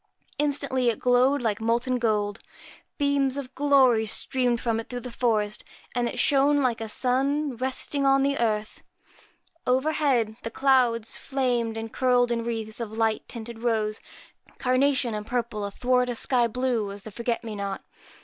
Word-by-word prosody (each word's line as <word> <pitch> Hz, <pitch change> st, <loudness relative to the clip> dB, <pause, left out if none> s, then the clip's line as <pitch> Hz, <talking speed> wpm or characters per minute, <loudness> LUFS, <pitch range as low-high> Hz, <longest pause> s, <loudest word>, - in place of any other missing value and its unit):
Instantly 280 Hz, -4 st, +1 dB
it 230 Hz, -, -1 dB
glowed 250 Hz, +2 st, +3 dB
like 220 Hz, -1 st, -1 dB
molten 240 Hz, +3 st, 0 dB
gold, 210 Hz, -3 st, 0 dB, 0.6 s
beams 280 Hz, -2 st, +1 dB
of 270 Hz, -2 st, -6 dB
glory 260 Hz, -6 st, +4 dB
streamed 245 Hz, +1 st, +1 dB
from 230 Hz, -1 st, -1 dB
it 225 Hz, -, -7 dB
through 245 Hz, -1 st, -5 dB
the 250 Hz, -, -7 dB
forest, 215 Hz, -3 st, 0 dB, 0.3 s
and 240 Hz, 0 st, 0 dB
it -, -, -7 dB
shone 285 Hz, +1 st, +3 dB
like 245 Hz, -4 st, 0 dB
a 220 Hz, -, -4 dB
sun 270 Hz, +4 st, +1 dB
resting 265 Hz, +3 st, 0 dB
on 270 Hz, 0 st, +4 dB
the 280 Hz, 0 st, +1 dB
earth. 215 Hz, -2 st, -1 dB, 0.9 s
Overhead, 260 Hz, -4 st, +1 dB
the 230 Hz, -, -4 dB
clouds 240 Hz, -3 st, +2 dB
flamed 245 Hz, -4 st, -1 dB
and 225 Hz, 0 st, -6 dB
curled 245 Hz, -1 st, +2 dB
in 230 Hz, -1 st, -1 dB
wreaths 225 Hz, -1 st, -4 dB
of 225 Hz, -2 st, -5 dB
light 225 Hz, -1 st, 0 dB
tinted 230 Hz, -1 st, -7 dB
rose, 220 Hz, -3 st, 0 dB, 0.6 s
carnation, 255 Hz, -1 st, +1 dB
and 210 Hz, 0 st, -5 dB
purple, 235 Hz, -4 st, -2 dB
athwart 250 Hz, +5 st, 0 dB
a 245 Hz, -, -2 dB
sky 240 Hz, 0 st, +2 dB
blue 235 Hz, -3 st, -1 dB
as 200 Hz, 0 st, -9 dB
the 220 Hz, -, -9 dB
forget 235 Hz, +2 st, -2 dB
me 225 Hz, -2 st, -6 dB
not. 200 Hz, -1 st, -4 dB
245 Hz, 160 wpm, -26 LUFS, 225-260 Hz, 0.9 s, glory